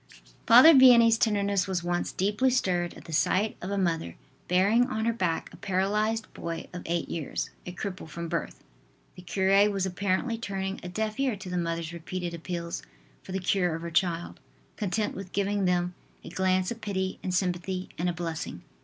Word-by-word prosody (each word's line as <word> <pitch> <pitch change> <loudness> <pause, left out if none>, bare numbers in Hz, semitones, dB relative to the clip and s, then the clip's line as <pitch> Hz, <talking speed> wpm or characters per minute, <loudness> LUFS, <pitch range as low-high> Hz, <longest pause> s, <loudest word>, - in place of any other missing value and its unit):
Father 250 +8 +9
Vianney's 235 -4 +7
tenderness 200 -3 +1
was 185 -3 -2
once 175 0 -1
deeply 210 +7 +1
stirred 180 -9 0
at - - -13
the 165 - -8
sight 200 +7 +2
of 185 - -5
a 200 - -1
mother 165 - -1 0.3
bearing 200 +7 +3
on 220 -2 -2
her 230 - +2
back 185 -7 -2
a - - -11
paralyzed 210 +3 0
boy 165 0 -5
of 180 - -5
eight 170 0 -1
years, 160 -4 -4 0.2
a - - -4
cripple 185 -2 -6
from 170 +2 -5
birth. 170 0 -4 0.5
The 180 - -11
cure 195 +3 +3
was 195 -2 -1
apparently 200 +5 -1
turning 195 -3 -3
a 180 - -6
deaf 215 +4 -3
ear 265 -5 +1
to 190 -2 -9
the - - -2
mother's 165 -1 -2
repeated 175 +1 -5
appeals 170 0 -4 0.4
for - - -10
the 190 - -1
cure 180 -2 +1
of 165 - -6
her 170 - -5
child, 170 0 0 0.4
content 210 +1 -1
with 190 -1 -8
giving 200 0 0
them 180 0 +1 0.3
a - - -8
glance 185 0 +1
of 230 -1 -6
pity 190 -2 -2
and 185 - -3
sympathy 180 0 -1
and 175 +1 +1
a - - -1
blessing. 165 -1 -5
185 Hz, 190 wpm, -28 LUFS, 175-205 Hz, 0.5 s, Father